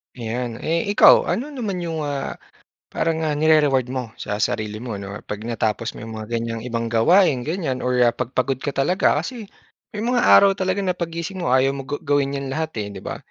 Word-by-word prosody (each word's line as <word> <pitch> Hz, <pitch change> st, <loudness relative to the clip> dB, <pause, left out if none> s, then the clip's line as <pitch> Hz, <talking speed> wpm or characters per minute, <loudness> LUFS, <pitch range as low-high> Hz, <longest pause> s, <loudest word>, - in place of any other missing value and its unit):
Ayan. 120 Hz, 0 st, -4 dB
Eh, 165 Hz, +1 st, 0 dB
ikaw, -, -, +7 dB
ano 270 Hz, +6 st, -2 dB
naman 215 Hz, -10 st, -4 dB
'yong, 165 Hz, -2 st, -3 dB
ah, 140 Hz, -1 st, -4 dB, 0.6 s
parang 165 Hz, -1 st, 0 dB
nga 155 Hz, -, 0 dB
nire-reward 145 Hz, -4 st, +3 dB
mo 125 Hz, -3 st, -4 dB
sa 105 Hz, -3 st, -4 dB
sarili 110 Hz, 0 st, -1 dB
mo 120 Hz, 0 st, -6 dB
'no 100 Hz, 0 st, -6 dB
'pag 105 Hz, 0 st, -5 dB
natapos 115 Hz, 0 st, -2 dB
mo 110 Hz, -, -8 dB
'yong 115 Hz, -, -8 dB
mga 110 Hz, -, -8 dB
ganyang 115 Hz, 0 st, -4 dB
ibang 115 Hz, -1 st, -3 dB
gawain 130 Hz, -, +4 dB
ganyan 150 Hz, -3 st, -3 dB
or, 125 Hz, 0 st, 0 dB
ah, 120 Hz, -, +3 dB
'pag 125 Hz, -2 st, -4 dB
pagod 130 Hz, 0 st, 0 dB
ka -, -, -2 dB
talaga? 140 Hz, +7 st, +2 dB
Kasi 230 Hz, -6 st, -5 dB, 0.4 s
may 215 Hz, +1 st, -5 dB
mga 245 Hz, 0 st, +2 dB
araw 200 Hz, -1 st, +7 dB
talaga 190 Hz, 0 st, -1 dB
na 180 Hz, -, +1 dB
paggising 170 Hz, +2 st, -5 dB
mo 170 Hz, -, -1 dB
ayaw 130 Hz, +1 st, +3 dB
mo 140 Hz, -, -5 dB
ga 140 Hz, +2 st, -4 dB
gawin 140 Hz, -1 st, +1 dB
'yan 140 Hz, -, -4 dB
lahat, 160 Hz, +1 st, -2 dB
eh, 105 Hz, -1 st, -2 dB
'di 95 Hz, -, -9 dB
ba? -, -, -5 dB
135 Hz, 210 wpm, -22 LUFS, 115-170 Hz, 0.6 s, ikaw